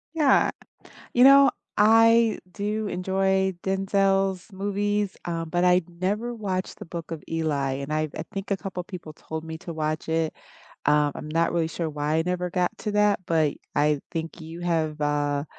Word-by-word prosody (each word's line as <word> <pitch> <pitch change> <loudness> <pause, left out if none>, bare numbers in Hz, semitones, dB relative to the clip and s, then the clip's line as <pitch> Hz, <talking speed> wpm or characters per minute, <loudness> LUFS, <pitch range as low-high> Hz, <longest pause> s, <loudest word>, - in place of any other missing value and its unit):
Yeah, 300 -4 +4 0.6
you 245 - +5
know, 275 +1 +8 0.3
I 225 +1 +5
do 210 +2 -2
enjoy 190 +1 +1
Denzel's 195 0 +1
movies, 205 +1 -1
um, 165 -1 -3
but 175 +1 +1
I've 180 -1 +4
never 200 +7 -2
watched 190 -4 -3
The - - -6
Book 170 0 -7
of 160 -2 -5
Eli, 150 -5 0
and 140 +2 -4
I 155 0 0
I 160 - -3
think 195 0 -5
a 200 - +2
couple 190 -2 -5
of 175 - -17
people 175 -5 -8
told 160 +1 -7
me 160 0 -6
to 170 - -7
watch 155 0 -2
it. 160 -1 0 0.5
Um, 150 0 +3
I'm 150 - -7
not 165 +2 +1
really 170 -2 +1
sure 165 0 -3
why 150 0 -2
I 160 - +2
never 180 0 -1
got 180 0 0
to 210 - -3
that, 210 0 +3
but 160 -3 +2 0.2
I 150 0 +3
think 165 0 -4
you 165 +2 -8
have, 160 -3 -1
uh, 145 -1 0
175 Hz, 180 wpm, -25 LUFS, 160-195 Hz, 0.6 s, know